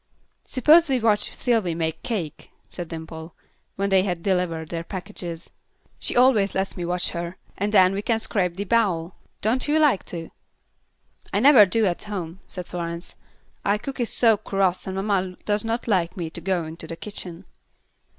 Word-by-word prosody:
"Suppose 305 +5 +5
we 260 -2 +2
watch 215 -2 +2
Sylvy 220 -9 0
make 160 -1 -2
cake," 180 -11 -4 0.2
said 175 -2 -6
Dimple, 160 0 -8 0.4
when 200 +1 -1
they 190 -1 +5
had 180 -3 -2
delivered 180 -4 0
their 165 -1 -3
packages. 180 -2 -7 0.5
"She - - -1
always 245 -6 +4
lets 190 +1 -1
me 180 - -4
watch 175 0 0
her. 170 +1 -5 0.2
And 205 +2 -1
then 190 -2 +6
we 200 - -2
can 225 +1 +1
scrape 180 -6 0
the 200 - -1
bowl. 190 -6 +1 0.3
Don't 240 +6 +1
you 300 +1 +3
like 295 -10 +4
to?" 165 -2 -7 1.0
"I 200 - +1
never 250 -4 +8
do 225 +3 +2
at 180 0 -1
home," 185 -4 -5
said 180 -1 -6
Florence. 170 0 -5 0.5
"Our 200 +1 +2
cook 265 +5 -7
is 235 -3 -1
so 225 -3 +4
cross 195 -2 0
and 190 - -3
mamma 190 -2 -1
does 205 0 +1
not 230 +2 -2
like 180 -4 +1
me 165 -3 -4
to 170 - -8
go 180 -1 0
into 160 +2 -7
the 165 - -5
kitchen." 185 -3 -7
190 Hz, 180 wpm, -24 LUFS, 170-215 Hz, 1.0 s, never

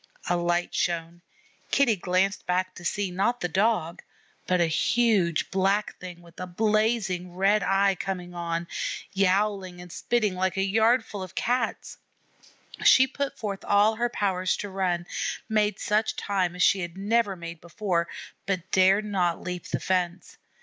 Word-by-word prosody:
A 175 - +2
light 175 0 0
shone. 170 0 -2 0.5
Kitty 260 -6 +3
glanced 185 +2 0
back 185 +1 0
to 175 - -12
see, 195 +2 -1
not 200 +7 0
the 175 - -1
Dog, 185 -2 0 0.5
but 180 0 +2
a 170 - +4
huge 180 0 +1
Black 195 +2 +1
Thing 175 -1 -9
with 170 0 -16
a 185 - -4
blazing 210 -2 0
red 200 +3 +3
eye 195 +1 +3
coming 180 -1 -5
on, 170 -1 -3 0.5
yowling 195 -1 +1
and 175 -1 -11
spitting 215 0 0
like 185 +1 -1
a 190 - +2
yard 225 +4 +3
full 205 - -7
of 185 -1 -8
Cats. 250 +2 -2 0.8
She 260 - +7
put 275 +1 -4
forth 200 -3 -4
all 205 +2 +4
her 240 +1 0
powers 185 -5 0
to 205 - -5
run, 180 -3 -1 0.4
made 210 -2 +1
such 215 0 0
time 185 -3 -1
as 180 - +1
she 195 - +4
had 175 0 -5
never 205 0 +1
made 170 -2 -8
before, 170 0 -1 0.4
but 190 -1 -2
dared 190 +3 +4
not 180 -5 0
leap 180 -1 -5
the - - -2
fence. 180 -1 -2
190 Hz, 160 wpm, -26 LUFS, 175-210 Hz, 0.8 s, She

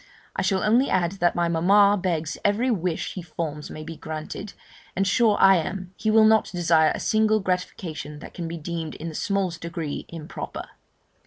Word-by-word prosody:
I - - 0
shall 190 -2 +1
only 240 +6 +3
add, 175 -2 +1
that 175 0 +2
my 175 0 +1
mamma 200 +5 +4
begs 170 -5 -2
every 220 +5 +2
wish 180 -6 -2
he 185 - -5
forms 155 -3 -5
may 155 - -7
be 165 +1 -7
granted, 155 +6 -6 0.4
and 195 - +1
sure 210 +2 +3
I 195 -1 +7
am, 185 +2 -4
he 220 - -1
will 220 0 +6
not 220 0 +4
desire 165 -3 +3
a - - -5
single 215 0 +2
gratification 180 -5 -4
that 150 - -11
can 170 -2 -5
be 170 +1 -5
deemed 165 0 -5
in 165 +2 -6
the - - -8
smallest 185 -1 -1
degree 165 -3 -5
improper. 160 -2 -7
175 Hz, 185 wpm, -24 LUFS, 165-200 Hz, 0.4 s, I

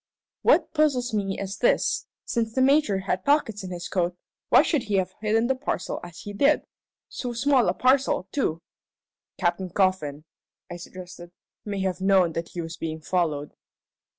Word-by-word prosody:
"What 325 -2 +3
puzzles 270 -6 +1
me 195 -2 -1
is 195 0 -5
this: 245 - +2 0.2
Since 225 -1 -1
the 260 - +2
Major 275 -8 +3
had 190 -1 -2
pockets 265 -8 +1
in 185 - -6
his 175 -1 -5
coat, 180 -1 -1 0.3
why - - +7
should 305 -6 +1
he 205 -2 -1
have 190 -1 0
hidden 220 +2 +2
the 265 - +2
parcel 260 -8 -3
as 175 0 -10
he 205 - -7
did? 280 +8 +3 0.4
So 245 -2 -5
small 250 -3 +3
a 180 - 0
parcel, 260 -7 +2
too!" 165 - -1 0.7
"Captain 185 +1 0
Coffin," 170 -6 0 0.5
I 175 - -5
suggested, 175 0 -10 0.3
"may 200 -2 -3
have 190 -1 -2
known 190 -3 +4
that 165 +1 -4
he 175 - -5
was 165 0 -7
being 160 -1 -4
followed." 155 -3 -1
190 Hz, 170 wpm, -25 LUFS, 175-245 Hz, 0.7 s, why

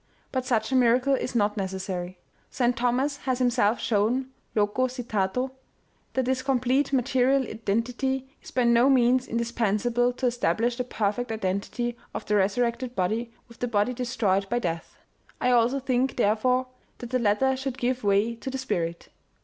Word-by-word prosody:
But 255 -1 -2
such 225 -1 +1
a - - +2
miracle 250 +2 +4
is 255 -1 -2
not 210 -1 +1
necessary. 190 -2 -4 0.3
St. 245 -1 +1
Thomas 250 +4 0
has 260 -3 -2
him 250 -1 +3
self 230 -2 +2
shown 235 +4 0 0.2
(loco 210 +4 +2
citato) 245 -1 -2 0.6
that 260 -1 0
this 260 0 0
complete 260 +1 +1
material 265 0 +2
identity 245 +4 -2
is - - -11
by 255 - +1
no 235 +2 +5
means 255 -1 +4
indispensable 235 +1 0
to 255 - -3
establish 235 0 +1
the 250 - 0
perfect 225 +1 -1
identity 220 +4 -2 0.2
of - - -4
the 210 - +1
resurrected 235 +5 0
body 220 +6 -1 0.2
with 235 -1 -17
the 245 - -1
body 215 +1 +1
destroyed 225 -6 0
by 240 - +1
death. 170 -8 -3 0.4
I 250 - +2
also 245 +3 +3
think, 260 0 0
therefore, 250 +3 +2 0.3
that 240 -1 -8
the 255 - +2
letter 235 +4 +2
should 265 -1 -4
give 255 -1 -1
way 205 +3 +2
to 265 - -6
the 265 - -3
spirit. 170 -10 -3
240 Hz, 165 wpm, -26 LUFS, 215-255 Hz, 0.6 s, no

